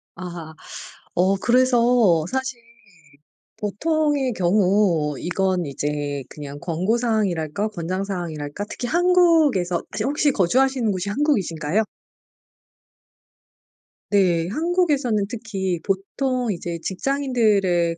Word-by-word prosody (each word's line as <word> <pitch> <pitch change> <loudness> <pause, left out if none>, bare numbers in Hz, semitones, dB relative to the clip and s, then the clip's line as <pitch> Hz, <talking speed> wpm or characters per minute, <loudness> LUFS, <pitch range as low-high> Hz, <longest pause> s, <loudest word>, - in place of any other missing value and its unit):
아하. 170 -3 -8 0.6
어 185 +3 +3
그래서 240 -6 +3
사실 265 -1 -3 1.0
보통의 290 +5 0
경우 180 -5 +2
이건 185 -1 -1
이제 145 -1 -3
그냥 145 -1 -8
권고 180 +8 0
사항이랄까? 205 -6 0
권장 185 0 -3
사항이랄까? 170 -3 -4
특히 245 - -4
한국에서 325 - +3 0.2
혹시 290 +3 +1
거주하시는 255 +4 +2
곳이 195 +1 -2
한국이신가요? 200 - 0 2.3
네. 175 -5 +3
한국에서는 295 - +1
특히 195 -6 -3
보통 240 +5 -1
이제 170 -2 -4
직장인들의 200 - +1
200 Hz, 235 characters per minute, -22 LUFS, 175-255 Hz, 2.3 s, 어